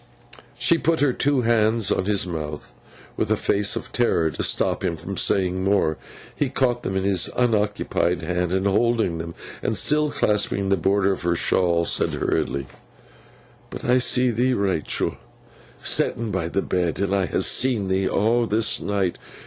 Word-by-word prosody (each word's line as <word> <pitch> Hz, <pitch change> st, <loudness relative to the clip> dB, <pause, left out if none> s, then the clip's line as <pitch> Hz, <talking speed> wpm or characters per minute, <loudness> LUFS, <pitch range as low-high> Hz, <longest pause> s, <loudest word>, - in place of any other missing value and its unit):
She 170 Hz, -, +3 dB
put 165 Hz, 0 st, +1 dB
her 140 Hz, -3 st, +3 dB
two 140 Hz, 0 st, +1 dB
hands 110 Hz, -2 st, +2 dB
on 95 Hz, -, 0 dB
his 100 Hz, -1 st, +1 dB
mouth, 75 Hz, -4 st, -6 dB, 0.4 s
with -, -, -2 dB
a -, -, +3 dB
face 100 Hz, 0 st, +1 dB
of -, -, -6 dB
terror, 85 Hz, -10 st, +1 dB
to -, -, -5 dB
stop -, -, 0 dB
him 85 Hz, -, -1 dB
from 90 Hz, +5 st, -7 dB
saying 95 Hz, -1 st, +1 dB
more. 95 Hz, -5 st, +1 dB, 0.4 s
He 145 Hz, -, -1 dB
caught 125 Hz, -2 st, 0 dB
them 95 Hz, -, -3 dB
in 95 Hz, -, -1 dB
his 95 Hz, -3 st, +1 dB
unoccupied 105 Hz, -7 st, 0 dB
hand, 90 Hz, +1 st, -1 dB
and 95 Hz, +1 st, 0 dB
holding 105 Hz, -4 st, +1 dB
them, 85 Hz, 0 st, -7 dB, 0.3 s
and 110 Hz, -, 0 dB
still 150 Hz, +8 st, +2 dB
clasping 100 Hz, -5 st, 0 dB
the 100 Hz, -, +4 dB
border 100 Hz, +2 st, +1 dB
of 95 Hz, -, -4 dB
her 85 Hz, 0 st, 0 dB
shawl, 85 Hz, 0 st, +1 dB
said -, -, +1 dB
hurriedly: 70 Hz, 0 st, -1 dB, 1.0 s
'But -, -, -8 dB
I 125 Hz, +1 st, +3 dB
see 125 Hz, 0 st, +3 dB
thee, 125 Hz, +3 st, +1 dB
Rachael, 95 Hz, -7 st, -1 dB, 0.6 s
setten 115 Hz, -2 st, 0 dB
by 95 Hz, -4 st, -2 dB
the 100 Hz, +3 st, -1 dB
bed. 90 Hz, -2 st, -1 dB
I 95 Hz, -2 st, +1 dB
ha' -, -, -1 dB
seen 120 Hz, -7 st, +2 dB
thee, 95 Hz, 0 st, 0 dB
aw 115 Hz, +2 st, +1 dB
this 110 Hz, +1 st, +1 dB
night. 100 Hz, -3 st, -1 dB
100 Hz, 170 wpm, -23 LUFS, 90-115 Hz, 1.0 s, the